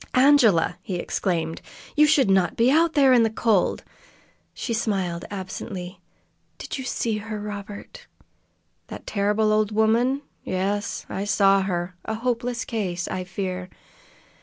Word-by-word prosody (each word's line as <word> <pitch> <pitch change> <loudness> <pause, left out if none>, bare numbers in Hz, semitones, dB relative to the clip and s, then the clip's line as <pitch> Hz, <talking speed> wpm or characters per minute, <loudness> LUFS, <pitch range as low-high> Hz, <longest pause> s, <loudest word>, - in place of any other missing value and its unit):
"Angela!" 250 - +4
he 185 - -4
exclaimed. 170 -2 -2 0.3
"You 300 0 +6
should 285 -5 +4
not 190 -2 +2
be 235 +3 +3
out 325 +2 +3
there 275 -4 +5
in 245 - +6
the 225 - +3
cold!" 220 -3 +1 0.7
She 235 - -4
smiled 190 -6 -1
absently. 185 -1 -6 0.6
"Did - - -6
you 260 - -5
see 225 -3 -1
her, 215 0 -5
Robert?" 205 0 -8 0.8
"That - - -9
terrible 210 +1 +1
old 215 0 +2
woman? 230 +6 +2 0.2
Yes, 200 +3 -2
I 195 - -4
saw 195 -1 +4
her. 180 -1 -2
A 220 - -3
hopeless 240 +1 -2
case, 185 -6 -3
I 185 -1 -3
fear." 185 0 -4
210 Hz, 135 wpm, -24 LUFS, 185-235 Hz, 0.8 s, You